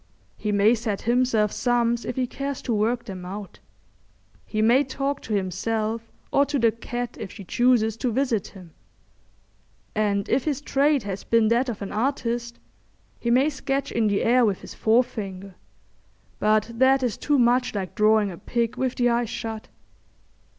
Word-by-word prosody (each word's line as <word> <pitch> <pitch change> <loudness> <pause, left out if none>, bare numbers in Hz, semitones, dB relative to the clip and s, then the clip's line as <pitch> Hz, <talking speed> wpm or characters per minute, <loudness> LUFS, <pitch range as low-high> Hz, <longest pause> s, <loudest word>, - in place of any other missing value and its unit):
He 210 - -3
may 205 +2 +4
set 220 -4 -3
himself 235 -3 +2
sums 240 -1 +1
if 245 - -4
he 255 - 0
cares 275 +2 -5
to 240 - -1
work 230 +3 0
them 185 -3 -7
out; 195 +2 -8 0.9
he 215 - -3
may 235 +6 +5
talk 275 +1 -3
to 215 - -3
himself 220 +4 -2 0.2
or 280 - +4
to 290 +1 -1
the 230 -3 +3
cat 240 +1 -5
if 190 - -6
she 200 - -9
chooses 225 +1 +2
to 250 0 -1
visit 245 -4 0
him; 180 -5 -14 1.2
and 205 -2 0
if 270 - +1
his 290 -3 0
trade 285 -2 +2
has 200 -1 -5
been 230 -2 +3
that 240 +3 +2
of 215 -3 -5
an 195 - -6
artist, 235 -1 -2 0.6
he 235 - -2
may 265 +6 +4
sketch 275 0 -2
in 225 -2 +1
the 200 -1 +1
air 245 +2 +4
with 205 -5 +1
his - - -10
forefinger; 200 -5 0 0.9
but 215 +1 +2
that 260 +2 +3
is 240 -4 0
too 295 -1 +1
much 245 -1 +2
like 190 -4 -3
drawing 215 -1 +3
a 170 - -10
pig 235 -2 -2
with 260 -1 -1
the 245 - +2
eyes 235 -1 +1
shut. 220 -1 -5
230 Hz, 170 wpm, -24 LUFS, 210-250 Hz, 1.2 s, may